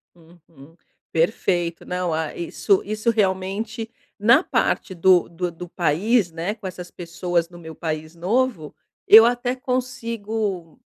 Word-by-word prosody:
Uhum. 165 -3 -19 0.4
Perfeito, 170 0 0
não, 180 -2 -2
ah, 160 -1 -3
isso 185 +3 +1
isso 215 +3 -1
realmente 215 +2 -1 0.3
Na 235 - +5
parte 195 - 0
do 180 0 +4
do 175 +1 -3
do 175 +1 -9
país, 180 +5 +1
né, 170 +5 -3
com 200 -4 -7
essas 180 -1 -8
pessoas 175 0 -2
no 175 - -13
meu 160 -1 -9
país 155 0 -5
novo 185 - -1 0.3
eu 225 +1 +10
até 245 +1 0
consigo 225 - -3
180 Hz, 130 wpm, -22 LUFS, 170-220 Hz, 0.4 s, eu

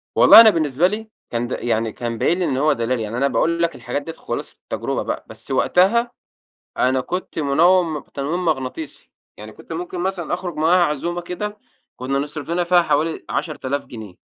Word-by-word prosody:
والله - - +10
أنا 225 - +8
بالنسبة 160 -2 +2
لي 215 +2 -5 0.2
كان 120 0 -2
د - - -11
يعني 115 -1 -1
كان 115 0 -4
باين 175 +10 +1
لي 180 - +1
إن 135 -5 -1
هو 150 +2 +3
دلال، 120 -1 -1
يعني 110 +2 -4
أنا 140 +2 +2
باقول 170 +4 +1
لك 170 - 0
الحاجات 145 - -4
ديّة 165 +3 -7
خُلاصة - - -6
التجربة - - -3
بقى، - - -4
بس - - -10
وقتها 235 +7 +3 0.7
أنا 130 +1 +2
كنت 180 +8 -5
منوّم 160 +2 +3
تنويم 155 +8 -4
مغناطيسي، 160 - -3 0.3
يعني - - -10
كنت - - -12
ممكن 360 0 -5
مثلًا 180 - -2
أخرج 175 -3 -5
معاها 175 +3 +4
عزومة 170 +4 -2
كده 205 +4 -5 0.4
كنّا 135 +2 -2
نصرف 150 +1 -5
لنا 175 +1 +1
فيها 175 0 +4
حوالي 160 0 0
10,000 140 -1 -3
جنيه. 110 -6 -10
160 Hz, 185 wpm, -21 LUFS, 135-180 Hz, 0.7 s, والله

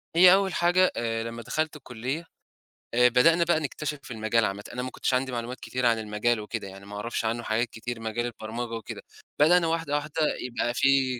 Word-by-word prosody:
هي 180 +1 +9
أول 195 -1 +2
حاجة 180 +2 +3
آآ، 115 -1 -1
لمّا 115 0 -6
دخلت 155 +7 -2
الكلية 130 +3 -5 0.7
آآ 125 +1 +6
بدأنا 165 +8 +5
بقى 170 -2 +2
نكتشف 150 0 -4
في - - -10
المجال 110 0 +1
عامّةً، 100 +1 -3
أنا 125 - -3
ما 130 - -3
كُنّتش - - -1
عندي 130 0 +1
معلومات 120 +1 -4
كتيرة 125 -1 -1
عن 115 -1 +3
المجال 110 +2 0
وكده 105 -1 -5
يعني 95 +1 -11
ما 100 0 -9
أعرفش 115 +2 -3
عنه 115 +2 -1
حاجات 115 +3 0
كتير 115 +1 -6
مجال 115 +1 -2
البرمجة 115 0 -5
وكده، 115 -2 -7 0.4
بدأنا 170 +2 +5
واحدة، 160 -3 -1
واحدة 150 0 -3 0.3
يبقى 120 -1 -2
في 135 -2 +3
120 Hz, 200 wpm, -27 LUFS, 115-150 Hz, 0.7 s, هي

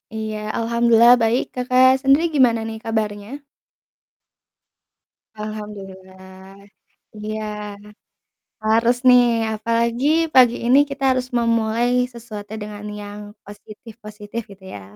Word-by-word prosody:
Iya, 215 -1 -4 0.2
alhamdulillah 235 +1 +4
baik, 230 +3 +1
Kakak 255 +1 +3
sendiri 280 +4 +3
gimana 240 -4 +3
nih 220 - -7
kabarnya? 220 +5 -4 1.9
Alhamdulillah. 195 -2 -10 0.6
Iya, 215 +1 -5 1.2
harus 230 +3 +2
nih, 250 -1 +7 0.3
apalagi 230 +3 -1 0.3
pagi 245 -2 +6
ini 255 +3 +5
kita 275 0 -7
harus 255 0 -3
memulai 230 0 0 0.2
sesuatu 215 -3 -10
dengan 210 0 -8 0.2
yang 205 0 -9 0.2
positif-positif 210 +1 -10
gitu 195 -1 -15
ya. 100 - -9
225 Hz, 95 wpm, -20 LUFS, 210-240 Hz, 1.9 s, nih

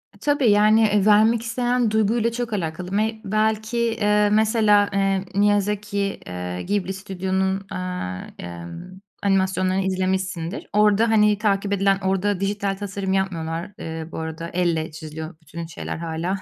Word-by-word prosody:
E, - - -18
tabii, 290 -5 +2
yani, 215 +2 +5
eee, 210 -2 +3
vermek 215 +2 +5
istenen 240 0 0
duyguyla 220 +2 +2
çok 235 -1 -3
alakalı. 180 -1 -3
Me 220 +2 0
belki, 220 +2 0
eee, 210 -3 +2
mesela, 210 -1 +4
eee, 195 -1 +1
Miyazaki, 205 0 +1
eee, 90 0 -5
Ghibli 190 -1 -1
Studio'nun, 190 0 -1 0.2
eee, 180 - -5
emm, 85 - -9 0.2
animasyonlarını 190 -1 +1
izlemişsindir. 190 -1 -2
Orada, 210 +2 +4
hani, 210 -1 +4
takip 200 -1 0
edilen, 195 0 +2
orada 195 +1 0
dijital 200 0 -1
tasarım 200 -1 -3
yapmıyorlar. 170 -1 -2
Eee, 160 -1 -5
bu - - -5
arada 160 +1 -5
elle 170 -3 0
çiziliyor 155 +1 -8
bütün 165 +1 -7
şeyler 165 - -6
hâlâ. 165 +3 -2
195 Hz, 140 wpm, -23 LUFS, 180-210 Hz, 0.2 s, yani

